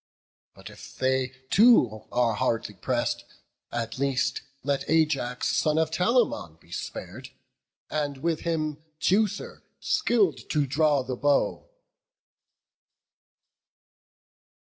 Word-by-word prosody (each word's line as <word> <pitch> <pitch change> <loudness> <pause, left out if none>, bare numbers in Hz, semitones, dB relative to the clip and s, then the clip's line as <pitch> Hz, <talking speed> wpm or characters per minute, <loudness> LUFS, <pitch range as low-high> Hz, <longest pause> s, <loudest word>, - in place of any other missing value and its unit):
But - - -11
if - - -13
they 130 0 +1 0.2
too 125 - +5
are 120 -2 +2
hardly 105 0 -1
press'd, 95 - -1 0.5
at 115 +1 -4
least 135 0 0 0.2
Let 140 0 -1
Ajax, 145 -6 +1
son 155 0 +2
of 160 -1 +1
Telamon, 180 - +1
be 85 - -22
spar'd, 90 - -7 0.6
And 145 -2 -2
with 160 +3 -1
him 155 -3 -2 0.2
Teucer, 200 +4 0 0.2
skilled 190 - +1
to 150 -2 +1
draw 145 0 +2
the 130 - -4
bow." 145 - +1
145 Hz, 100 wpm, -26 LUFS, 125-160 Hz, 0.6 s, too